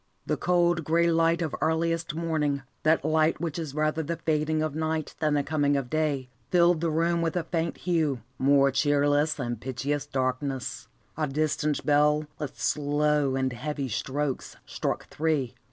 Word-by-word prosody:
The - - 0
cold, 175 -1 +2
grey 170 +2 +2
light 165 +1 +2
of 155 - -3
earliest 165 0 0
morning, 155 -4 -1 0.2
that 155 -2 +2
light 155 0 +2
which 170 -1 -3
is 150 -4 -5
rather 155 +1 +1
the 170 +2 -3
fading 155 0 0
of 155 -2 -2
night 160 0 -2
than 155 -2 +1
the 145 - +1
coming 145 -1 +1
of 130 -3 -4
day, 150 -4 0 0.2
filled 175 -2 +4
the 170 - +1
room 170 +2 +1
with 165 0 -1
a 175 - 0
faint 165 0 -2
hue, 160 -8 0 0.2
more 140 0 +4
cheerless 145 +2 +2
than 120 -4 -3
pitchiest 140 +4 -3
darkness. 130 0 -2 0.3
A 155 -1 0
distant 150 +1 -1
bell, 150 +1 +3
with 150 -4 -6
slow 145 -1 +1
and 130 -1 0
heavy 140 +2 -4
strokes, 135 +4 -3
struck - - -3
three. 150 -6 0
150 Hz, 165 wpm, -27 LUFS, 140-160 Hz, 0.3 s, filled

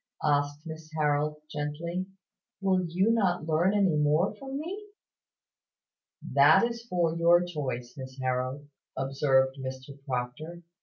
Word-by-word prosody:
asked 145 +1 +1
Miss 160 -1 -8
Harold, 150 0 +1 0.2
gently. 160 +5 -3 0.5
"Will 190 -2 +1
you 185 +6 +2
not 185 -8 +1
learn 165 +5 +2
any 195 -6 +3
more 150 +6 +2
from 270 +5 -7
me?" 390 +7 -6 1.5
"That - - +7
is 235 0 -3
for 170 -2 +1
your 170 +1 +5
choice, 135 -8 -4
Miss 130 -1 -9
Harold," 130 +2 -2 0.3
observed 135 0 +2
Mrs 130 +1 -7
Proctor. 140 +7 -4
155 Hz, 120 wpm, -28 LUFS, 135-180 Hz, 1.5 s, That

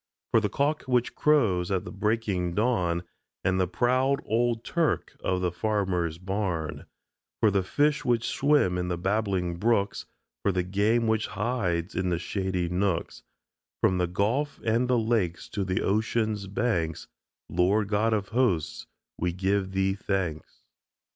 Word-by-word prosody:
For 115 - +5
the 105 -2 -1
cock 145 +7 0
which 125 -1 +1
crows 110 -13 +2
at 95 -2 -1
the - - -7
breaking 100 -4 -1
dawn, 90 -7 +1 0.4
And 95 0 +2
the 90 - +2
proud 130 +8 +2
old 115 0 +1
"turk" 170 -3 0
of 90 -1 0
the 90 -1 0
farmer's 90 -5 -1
barn, 90 -4 -3 0.5
For 110 - +4
the 100 -1 +2
fish 145 +10 +1
which 120 -1 +1
swim 140 -11 +2
in 90 - -2
the 90 -1 -1
babbling 95 -2 0
brooks, 105 0 0 0.3
For 100 - +2
the 90 -1 0
game 105 +6 +1
which 110 -1 +1
hides 95 -5 -1
in 90 0 -1
the 85 - +1
shady 90 0 -2
nooks, 90 0 -1 0.6
From 95 -1 +2
the 90 - +2
Gulf 115 +11 -1
and 115 +2 +2
the 125 -1 +3
Lakes 110 -7 0
to 100 - -2
the 95 0 -1
Oceans' 110 0 0
banks, 95 -7 -1 0.4
Lord 95 +4 +2
God 110 +2 +2
of 100 -2 -1
Hosts, 110 -10 0 0.3
we 90 +1 0
give 95 +2 0
Thee 95 0 +1
thanks! 95 -5 -3
100 Hz, 155 wpm, -27 LUFS, 90-115 Hz, 0.6 s, For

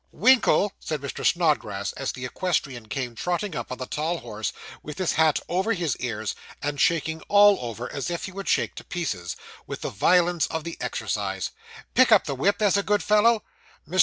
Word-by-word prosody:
'Winkle,' 215 -2 +4
said 155 - -3
Mr. 140 - -5
Snodgrass, 145 - +1
as 135 -1 -3
the 125 -1 -6
equestrian 135 -6 -2
came 125 0 -3
trotting 175 - -2
up 120 0 -5
on 125 - -4
the 130 - -4
tall 155 +6 -2
horse, 110 -2 -4 0.3
with 150 -1 -8
his 185 -3 +1
hat 160 -2 +3
over 190 +6 +1
his 170 - -1
ears, 110 -4 -3 0.3
and 145 0 -2
shaking 160 -1 +1
all 205 0 +7
over, 120 +1 -5
as 140 - -3
if 170 -1 -3
he - - -7
would 195 +1 -5
shake - - +1
to - - -9
pieces, 100 - -3 0.3
with - - -6
the - - -3
violence 175 - +3
of 160 -1 -4
the 170 +1 -5
exercise, - - -2 0.4
'pick 255 -2 +5
up 215 - +6
the 140 - -2
whip, 195 +10 +1
there's 205 -1 +3
a - - +3
good 205 +1 +1
fellow.' 210 +1 +4 0.4
Mr. 185 +4 -2
160 Hz, 195 wpm, -25 LUFS, 130-190 Hz, 0.4 s, all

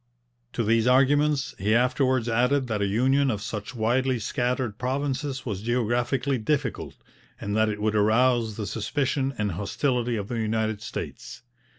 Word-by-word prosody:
To 120 - -1
these 115 +2 +2
arguments 140 +2 +3
he 105 +4 +2
afterwards 125 0 +2
added 125 +4 +2
that 110 -4 -2
a 100 - +1
union 130 +7 +2
of 105 -5 -1
such 105 +3 -6
widely 125 +3 +1
scattered 120 0 -2
provinces 135 +1 -2
was 100 -6 -3
geographically 120 +3 0
difficult, 140 +1 -2 0.4
and 100 +1 -3
that 110 0 +3
it 105 -1 -4
would 105 0 0
arouse 110 +1 +2
the 105 - -3
suspicion 135 - -1
and 105 -2 -1
hostility 120 - -1
of 100 -1 -4
the 120 0 -3
United 110 -1 -1
States. - - -7
120 Hz, 155 wpm, -26 LUFS, 110-130 Hz, 0.4 s, arguments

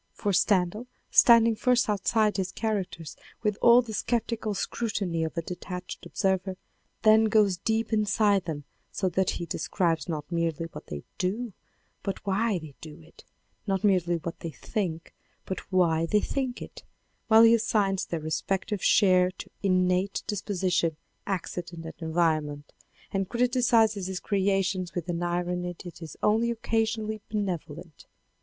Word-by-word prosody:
For 205 - -1
Stendhal 195 +4 +2 0.2
standing 230 -1 +6
first 250 +2 +2
outside 210 +1 +1
his 185 -1 -2
characters 195 -7 -3 0.3
with 210 -2 +1
all 240 +1 +7
the 225 -2 -7
sceptical 225 -2 -1
scrutiny 195 -6 -2
of 160 +2 -4
a 170 - -1
detached 180 +1 -7
observer, 190 +1 -1 0.5
then 220 0 +6
goes 210 -4 +3
deep 225 +4 -1
inside 205 -2 +2
them 150 -3 -4 0.3
so 190 - -1
that 185 +1 +1
he 170 - -4
de - - -5
scribes 165 -5 0
not 150 0 -4
merely 165 -1 -1
what - - -10
they 70 -1 -6 0.2
do, 210 +4 -2 0.5
but 195 - -5
why 200 +1 +1
they 155 -4 -9
do 155 0 -10
it, 165 0 -18 0.4
not 195 0 0
merely 180 -4 +3
what 165 0 -5
they 165 - -5
think, 165 -1 -4 0.3
but 190 - -6
why 165 -3 +2
they 210 - +3
think 260 +1 -3
it, - - -11 0.5
while 225 0 +7
he 230 0 +7
assigns 205 -4 +1
their 165 -2 -3
respective 190 +5 -2
share 185 -2 +5
to 185 - -10
innate 185 0 +1
dis 205 -2 -3
position, 180 -5 0 0.3
accident, 175 -3 -4
and 160 - -6
environment, 155 -3 -1 0.4
and 195 -1 -1
criticizes 235 -5 +2
his 190 -1 -4
creations 195 -2 0
with 175 -1 -3
an 170 0 -2
irony 175 0 -2
that 175 -1 -10
is 160 -3 -9
only 225 +3 +3
occasionally 225 -2 -1
benevolent. 175 -6 -5
190 Hz, 150 wpm, -27 LUFS, 170-215 Hz, 0.5 s, all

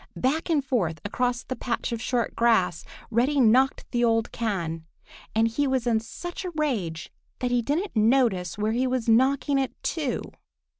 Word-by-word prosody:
Back 300 +7 0
and 295 -5 +2
forth 180 -12 0
across 245 +3 -1
the 260 - -5
patch 245 0 -3
of 230 -1 -3
short 240 0 -1
grass 220 -7 +2 0.3
Reddy 255 +6 +2
knocked 255 +3 +4
the 240 -1 +1
old 225 -1 +2
can, 170 -8 -3 0.5
and 225 +1 +4
he 280 +6 0
was 260 -2 0
in 230 -2 +2
such 350 +12 -7
a 365 - -3
rage 215 - -2 0.3
that 250 -1 -2
he 245 -1 +2
didn't 315 - -2
notice 215 -6 +2
where 210 +1 0
he 250 +3 +1
was 255 -2 -1
knocking 270 +4 +3
it 265 - -1
to. 295 -7 -2
240 Hz, 170 wpm, -26 LUFS, 220-265 Hz, 0.5 s, knocked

